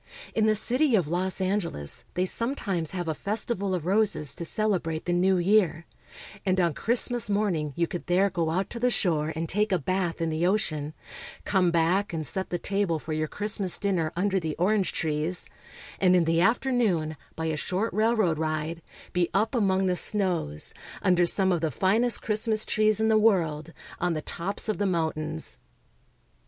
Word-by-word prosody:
In 220 Hz, -1 st, +2 dB
the 215 Hz, -, +3 dB
city 250 Hz, +5 st, +2 dB
of 180 Hz, -7 st, +1 dB
Los 180 Hz, +4 st, +1 dB
Angeles 185 Hz, -, -1 dB
they 180 Hz, +1 st, +1 dB
sometimes 195 Hz, -, -2 dB
have 175 Hz, -3 st, -4 dB
a 160 Hz, -, 0 dB
festival 200 Hz, +1 st, -2 dB
of 170 Hz, -3 st, -4 dB
roses 195 Hz, -6 st, +1 dB
to -, -, -6 dB
celebrate 170 Hz, -4 st, -1 dB
the 175 Hz, -, 0 dB
New 185 Hz, +2 st, +3 dB
Year, 180 Hz, -3 st, +2 dB, 0.6 s
and 185 Hz, -1 st, +1 dB
on 170 Hz, -3 st, +2 dB
Christmas 240 Hz, -, +2 dB
morning 195 Hz, -8 st, 0 dB
you 170 Hz, -, +1 dB
could 175 Hz, +1 st, -7 dB
there 190 Hz, +3 st, +2 dB
go 170 Hz, -2 st, -1 dB
out 185 Hz, +4 st, -1 dB
to 235 Hz, -, -5 dB
the 250 Hz, +1 st, +2 dB
shore 160 Hz, -9 st, +1 dB
and 165 Hz, +1 st, -3 dB
take 210 Hz, +5 st, 0 dB
a 185 Hz, -, +3 dB
bath 180 Hz, +2 st, -2 dB
in 165 Hz, -1 st, -1 dB
the 155 Hz, +2 st, -1 dB
ocean, 155 Hz, -7 st, -1 dB, 0.5 s
come 190 Hz, -3 st, +2 dB
back 170 Hz, +4 st, +1 dB
and 160 Hz, -2 st, -3 dB
set 190 Hz, +8 st, -2 dB
the 175 Hz, -, -1 dB
table 195 Hz, -2 st, -1 dB
for 155 Hz, +1 st, -6 dB
your 155 Hz, 0 st, -1 dB
Christmas 205 Hz, 0 st, 0 dB
dinner 185 Hz, -6 st, 0 dB
under 195 Hz, +2 st, +1 dB
the 160 Hz, -3 st, -4 dB
orange 190 Hz, +1 st, +1 dB
trees, 155 Hz, +3 st, -1 dB, 0.5 s
and 185 Hz, -1 st, +4 dB
in 180 Hz, -, +4 dB
the 165 Hz, +1 st, +2 dB
afternoon, 220 Hz, -8 st, +1 dB, 0.2 s
by 160 Hz, -, -4 dB
a 160 Hz, -1 st, -1 dB
short 185 Hz, +8 st, -2 dB
railroad 215 Hz, -7 st, +2 dB
ride, 155 Hz, +1 st, -2 dB, 0.3 s
be 175 Hz, -1 st, +1 dB
up 215 Hz, +5 st, +1 dB
among 195 Hz, -5 st, +2 dB
the 180 Hz, -1 st, +1 dB
snows, 175 Hz, -, 0 dB, 0.3 s
under 180 Hz, -1 st, +3 dB
some 190 Hz, +1 st, +3 dB
of 175 Hz, -3 st, 0 dB
the 160 Hz, -, 0 dB
finest 220 Hz, -, +2 dB
Christmas 215 Hz, 0 st, 0 dB
trees 215 Hz, 0 st, +2 dB
in 220 Hz, -, +2 dB
the 220 Hz, -1 st, +4 dB
world, 165 Hz, -8 st, +1 dB, 0.3 s
on 175 Hz, -1 st, 0 dB
the 155 Hz, -, -4 dB
tops 195 Hz, +6 st, -3 dB
of 215 Hz, -, -1 dB
the 205 Hz, -, +1 dB
mountains. 160 Hz, -3 st, -2 dB
185 Hz, 185 wpm, -27 LUFS, 165-210 Hz, 0.6 s, and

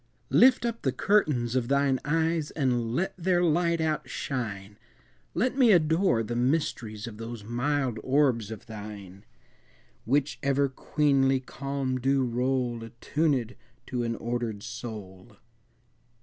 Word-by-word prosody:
I. -, -, -1 dB
Lift 255 Hz, -1 st, +6 dB
up 230 Hz, -1 st, -2 dB
the 130 Hz, -, +1 dB
curtains 130 Hz, -, +1 dB
of 125 Hz, -2 st, +1 dB
thine 140 Hz, -1 st, +2 dB
eyes 160 Hz, 0 st, 0 dB
And 120 Hz, -5 st, 0 dB
let 185 Hz, +4 st, 0 dB
their 180 Hz, 0 st, +2 dB
light 170 Hz, 0 st, +2 dB
outshine! 115 Hz, -10 st, -3 dB, 0.6 s
Let 255 Hz, +3 st, 0 dB
me 245 Hz, -4 st, +6 dB
adore 160 Hz, -, +3 dB
the 120 Hz, +2 st, -4 dB
mysteries 120 Hz, -5 st, -1 dB
Of 110 Hz, -3 st, -8 dB
those 115 Hz, -1 st, -7 dB
mild 125 Hz, +1 st, -1 dB
orbs 130 Hz, -5 st, +2 dB
of 110 Hz, -3 st, -8 dB
thine, 105 Hz, -3 st, -9 dB, 0.8 s
Which 140 Hz, +4 st, +1 dB
ever 140 Hz, 0 st, +2 dB
queenly 135 Hz, -1 st, +2 dB
calm 135 Hz, 0 st, -3 dB
do 135 Hz, +1 st, +2 dB
roll, 125 Hz, 0 st, 0 dB
Attunèd 125 Hz, +2 st, -1 dB, 0.3 s
to 125 Hz, -1 st, -3 dB
an 115 Hz, -1 st, -1 dB
ordered 115 Hz, -3 st, -3 dB
soul! 105 Hz, -2 st, -8 dB
130 Hz, 130 wpm, -27 LUFS, 115-150 Hz, 0.8 s, Lift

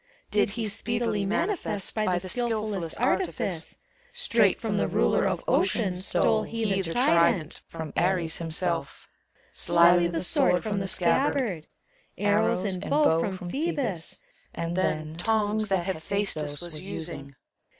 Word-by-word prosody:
Did 210 Hz, 0 st, +2 dB
he 230 Hz, -, -1 dB
speedily 225 Hz, -1 st, -1 dB
manifest 220 Hz, -, -1 dB
By 215 Hz, -5 st, +1 dB
the 180 Hz, +1 st, -4 dB
skilf 240 Hz, +5 st, 0 dB, 0.2 s
ullest 170 Hz, -5 st, -4 dB
artifice. 255 Hz, +9 st, -1 dB, 0.3 s
Straight -, -, +2 dB
from -, -, -2 dB
the -, -, +1 dB
Ruler -, -, +2 dB
of -, -, -2 dB
Ocean 200 Hz, -6 st, +2 dB
stole 190 Hz, +4 st, +1 dB
He 215 Hz, -3 st, -1 dB
the 170 Hz, -3 st, -4 dB
trident 170 Hz, -, +3 dB
— -, -, -50 dB
from 160 Hz, -2 st, -7 dB
Ares 175 Hz, -2 st, +1 dB
himself 165 Hz, -2 st, -3 dB, 0.5 s
Slyly 170 Hz, 0 st, +4 dB
the 170 Hz, 0 st, -2 dB
sword 180 Hz, 0 st, +2 dB
from 210 Hz, -2 st, -1 dB
the 195 Hz, -, -3 dB
scabbard; 190 Hz, -, +1 dB, 0.5 s
Arrows 205 Hz, -1 st, +2 dB
and 190 Hz, -3 st, -3 dB
bow 290 Hz, -, +4 dB
from 180 Hz, -1 st, -3 dB
Phcebus, 270 Hz, -, -2 dB, 0.4 s
and 170 Hz, +1 st, -3 dB
then 155 Hz, -3 st, -1 dB
Tongs 215 Hz, +2 st, +1 dB
that 190 Hz, -4 st, 0 dB
Hephadstos 160 Hz, -5 st, -2 dB
was 165 Hz, -3 st, -5 dB
using. 160 Hz, -7 st, -6 dB
185 Hz, 140 wpm, -27 LUFS, 170-215 Hz, 0.5 s, Slyly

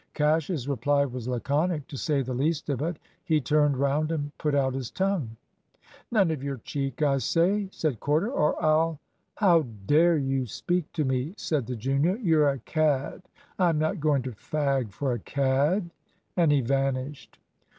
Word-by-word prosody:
Cash's 150 Hz, -2 st, +1 dB
reply 140 Hz, +2 st, +1 dB
was 125 Hz, -3 st, -6 dB
laconic, 145 Hz, +5 st, 0 dB
to 150 Hz, -, -8 dB
say 140 Hz, 0 st, 0 dB
the 130 Hz, 0 st, -4 dB
least 150 Hz, +5 st, -1 dB
of 135 Hz, -, -2 dB
it. 165 Hz, +1 st, -2 dB, 0.3 s
He 160 Hz, -4 st, +2 dB
turned 150 Hz, -1 st, +2 dB
round 140 Hz, +3 st, +1 dB
and 145 Hz, -2 st, -3 dB
put 150 Hz, -2 st, 0 dB
out 135 Hz, -2 st, +2 dB
his 130 Hz, -3 st, -4 dB
tongue. 185 Hz, -, -2 dB, 0.7 s
"None 195 Hz, -7 st, +3 dB
of 155 Hz, -4 st, -3 dB
your 140 Hz, -1 st, -3 dB
cheek, 135 Hz, +3 st, -3 dB
I 140 Hz, -2 st, +3 dB
say," 190 Hz, +8 st, +1 dB
said 150 Hz, -, -2 dB
Corder, 155 Hz, -, +1 dB
"or 150 Hz, -, +1 dB
I'll 155 Hz, 0 st, +2 dB, 0.2 s
" -, -, -48 dB
"How 175 Hz, -6 st, +4 dB, 0.2 s
dare 165 Hz, -, +4 dB
you 135 Hz, -2 st, -1 dB
speak 175 Hz, -, -2 dB
to 155 Hz, -3 st, 0 dB
me!" 130 Hz, +7 st, -1 dB
said 145 Hz, -7 st, -1 dB
the 125 Hz, -, -3 dB
junior; 135 Hz, -, +1 dB
"you're 160 Hz, -, +3 dB
a 140 Hz, -, -1 dB
cad 150 Hz, 0 st, 0 dB, 0.4 s
I'm 170 Hz, -4 st, +3 dB
not 155 Hz, +5 st, 0 dB
going 145 Hz, -3 st, +1 dB
to 130 Hz, -, -4 dB
fag 135 Hz, 0 st, -1 dB
for 135 Hz, +4 st, -2 dB
a 120 Hz, -, -3 dB
cad." 140 Hz, -, 0 dB, 0.4 s
And 170 Hz, -4 st, +3 dB
he 145 Hz, -2 st, +3 dB
vanished. 135 Hz, +2 st, -2 dB
145 Hz, 175 wpm, -27 LUFS, 135-160 Hz, 0.7 s, How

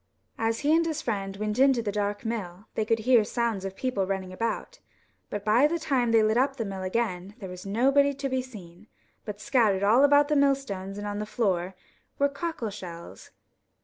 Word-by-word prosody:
As 225 Hz, 0 st, 0 dB
he 300 Hz, +2 st, +3 dB
and 335 Hz, -, +3 dB
his 320 Hz, -3 st, -3 dB
friend 195 Hz, -4 st, -3 dB
went 215 Hz, +2 st, -2 dB
into 265 Hz, -3 st, +4 dB
the 205 Hz, -, -1 dB
dark 205 Hz, +2 st, -2 dB
mill 200 Hz, -4 st, -4 dB
they 220 Hz, -, -1 dB
could 225 Hz, +1 st, +2 dB
hear 245 Hz, -3 st, +6 dB
sounds 230 Hz, -3 st, -1 dB
of 190 Hz, 0 st, -5 dB
people 210 Hz, -7 st, -1 dB
running 190 Hz, -1 st, -3 dB
about, 230 Hz, -, -3 dB, 0.5 s
but 205 Hz, -1 st, -5 dB
by 235 Hz, +7 st, +5 dB
the 340 Hz, +3 st, -1 dB
time 265 Hz, -7 st, 0 dB
they 225 Hz, -1 st, +5 dB
lit 215 Hz, +1 st, +2 dB
up 270 Hz, +2 st, +2 dB
the 230 Hz, -4 st, -3 dB
mill 195 Hz, -1 st, -5 dB
again 190 Hz, -1 st, -2 dB
there 195 Hz, -6 st, -8 dB
was 180 Hz, +1 st, -9 dB
nobody 275 Hz, +7 st, +3 dB
to 275 Hz, 0 st, -3 dB
be 260 Hz, -1 st, -1 dB
seen, 205 Hz, -6 st, -12 dB, 0.4 s
but 210 Hz, -1 st, -6 dB
scattered 220 Hz, -7 st, +2 dB
all 225 Hz, +7 st, +5 dB
about 285 Hz, 0 st, +5 dB
the 300 Hz, -, +1 dB
millstones 270 Hz, -9 st, 0 dB
and 205 Hz, -, -5 dB
on 205 Hz, 0 st, -3 dB
the 210 Hz, -, -4 dB
floor 190 Hz, -5 st, -1 dB, 0.4 s
were 280 Hz, 0 st, +3 dB
cockle 280 Hz, -6 st, -4 dB
shells. 170 Hz, -4 st, -9 dB
220 Hz, 205 wpm, -27 LUFS, 195-265 Hz, 0.5 s, hear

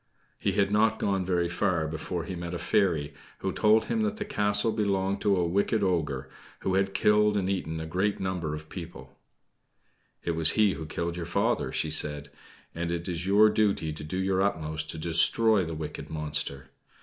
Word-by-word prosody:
He 100 Hz, -, 0 dB
had 100 Hz, 0 st, +1 dB
not 110 Hz, +1 st, +3 dB
gone 95 Hz, -2 st, 0 dB
very 90 Hz, -1 st, 0 dB
far 85 Hz, -2 st, 0 dB
before 80 Hz, +2 st, -4 dB
he 90 Hz, -, -6 dB
met 85 Hz, 0 st, -5 dB
a -, -, -2 dB
fairy, 80 Hz, -8 st, 0 dB, 0.3 s
who -, -, -1 dB
told 110 Hz, +1 st, +3 dB
him 225 Hz, -, -1 dB
that 215 Hz, 0 st, -1 dB
the 210 Hz, -, -4 dB
castle 105 Hz, -, +1 dB
belonged 100 Hz, -2 st, 0 dB
to 100 Hz, -2 st, +3 dB
a 90 Hz, -, +1 dB
wicked 100 Hz, +4 st, +1 dB
ogre, 75 Hz, -8 st, -1 dB, 0.3 s
who 95 Hz, -, -1 dB
had 95 Hz, 0 st, 0 dB
killed 105 Hz, 0 st, +3 dB
and 95 Hz, -2 st, 0 dB
eaten 80 Hz, -5 st, -2 dB
a 80 Hz, -, -5 dB
great 95 Hz, +6 st, -1 dB
number 90 Hz, -5 st, -2 dB
of 75 Hz, 0 st, -9 dB
people. 75 Hz, -7 st, -9 dB, 1.1 s
"It 85 Hz, -, -1 dB
was 80 Hz, -1 st, +3 dB
he 105 Hz, -2 st, +4 dB
who 80 Hz, -2 st, -7 dB
killed 85 Hz, +2 st, -3 dB
your 85 Hz, -1 st, -5 dB
father," 85 Hz, -, 0 dB
she -, -, -1 dB
said. 75 Hz, -1 st, 0 dB, 0.4 s
"And 85 Hz, 0 st, -3 dB
it 85 Hz, 0 st, -3 dB
is 90 Hz, 0 st, -3 dB
your 105 Hz, +2 st, +6 dB
duty 100 Hz, -8 st, +1 dB
to 75 Hz, -, -8 dB
do 80 Hz, +5 st, -5 dB
your 95 Hz, 0 st, +1 dB
utmost 80 Hz, -5 st, -1 dB
to 80 Hz, -, -1 dB
destroy 95 Hz, +6 st, +4 dB
the 80 Hz, 0 st, -5 dB
wicked 75 Hz, -1 st, -6 dB
monster. 75 Hz, -3 st, -3 dB
90 Hz, 195 wpm, -28 LUFS, 80-100 Hz, 1.1 s, your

